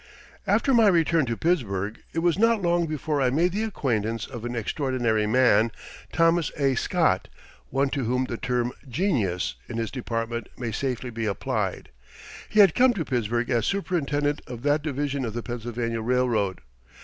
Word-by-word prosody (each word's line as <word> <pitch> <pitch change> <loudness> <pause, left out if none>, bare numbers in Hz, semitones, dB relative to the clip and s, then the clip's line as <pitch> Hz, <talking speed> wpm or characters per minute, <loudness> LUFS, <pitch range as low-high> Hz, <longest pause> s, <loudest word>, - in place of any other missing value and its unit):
After 270 - +3
my 230 -3 +6
return 165 -5 +3
to 115 -1 -2
Pittsburgh 110 - -1
it 165 - -2
was 175 +2 +2
not 230 0 +4
long 170 -1 +2
before 150 -1 -1
I 130 - +3
made 165 +7 +2
the 210 +4 -1
acquaintance 115 - -1
of 120 -4 -8
an 120 0 -4
extraordinary 115 -2 0
man, 115 -1 +4 0.4
Thomas 165 -2 +2
A. 135 -2 +2
Scott, 125 - +1 0.4
one 135 +1 +1
to 135 -2 -2
whom 125 +2 +1
the 120 - -4
term 125 -1 -1 0.2
"genius" 115 - 0 0.2
in 115 - -4
his 115 -1 -2
department 115 -2 -3
may 120 -2 -3
safely 125 +1 -3
be 115 -1 -3
applied. 100 - -2 0.6
He 215 - +6
had 195 -5 +6
come 255 -1 +4
to 165 -5 -2
Pittsburgh 120 -1 -1
as 115 -2 +1
superintendent 150 -7 0
of 120 -1 -8
that 145 +1 +2
division 140 -2 -2
of 115 -2 -4
the 120 - -3
Pennsylvania 120 -1 -3
Railroad. 115 -5 0
125 Hz, 170 wpm, -25 LUFS, 115-160 Hz, 0.6 s, my